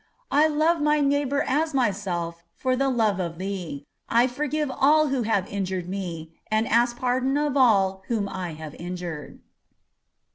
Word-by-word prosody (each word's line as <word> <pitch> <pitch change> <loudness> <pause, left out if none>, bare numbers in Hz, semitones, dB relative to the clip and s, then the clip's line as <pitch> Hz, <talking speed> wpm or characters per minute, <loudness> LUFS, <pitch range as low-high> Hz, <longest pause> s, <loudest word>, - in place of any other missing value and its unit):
I 295 +3 +5
love 315 +2 +2
my 300 0 +3
neighbor 285 0 +1
as 305 +3 0
myself 180 -8 -1
for 255 -1 0
the 270 +1 +1
love 220 -6 +1
of 170 -2 -3
Thee. 180 -7 -5 0.2
I 235 +1 +4
forgive 295 +3 -2
all 300 +3 +4
who 265 -2 0
have 210 -4 +1
injured 190 -3 -3
me, 175 -4 -5 0.2
and 215 +1 +1
ask 240 +1 +2
pardon 255 +2 +1
of 295 -1 0
all 195 -7 +3
whom 215 -4 -1
I 185 -4 -5
have 155 -1 -8
injured. 175 -4 -6
230 Hz, 155 wpm, -25 LUFS, 185-275 Hz, 0.2 s, I